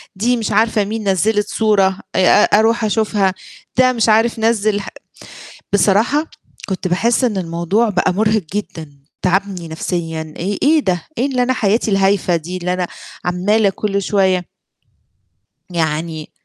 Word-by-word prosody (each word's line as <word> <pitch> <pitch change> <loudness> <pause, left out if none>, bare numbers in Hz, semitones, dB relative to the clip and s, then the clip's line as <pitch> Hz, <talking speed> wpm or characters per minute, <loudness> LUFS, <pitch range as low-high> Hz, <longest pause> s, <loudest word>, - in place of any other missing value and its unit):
دي 240 +6 +1
مش 220 -2 -3
عارفة 215 0 +2
مين 215 0 -3
نزّلِت 210 +3 +1
صورة، 195 -4 +2 0.2
آآ 185 - +3 0.2
أ 210 - +4
أروح 225 +1 +2
أشوفها، 210 -3 +1 0.4
ده 255 0 +4
مش 230 -2 +1
عارف 225 +1 +3
نزِّل 215 -2 +1
ح 195 - -7 0.8
بصراحة 215 +10 +2 0.4
كنت 185 -1 -2
باحس 230 +8 +1
إن 230 -5 +1
الموضوع 175 +6 0
بقى 185 -2 +1
مرهق 215 +1 +1
جدًا 165 -7 -5 0.3
تعبني 185 -2 -1
نفسيًا، 160 -1 -4
إيه 195 +3 -2
إيه 310 +2 +4
ده؟! 185 - -1
إيه 245 - +1
اللي 260 -3 0
أنا 255 +1 +1
حياتي 220 -2 0
الهايفة 195 -2 +2
دي 170 +3 -4
اللي 180 0 -2
أنا 180 -1 -2 0.4
عمالة 200 +4 +2
كلّ 200 +1 -2
شوية 190 -3 +1 1.2
يعني 160 -2 -3
200 Hz, 145 wpm, -17 LUFS, 180-220 Hz, 1.2 s, أ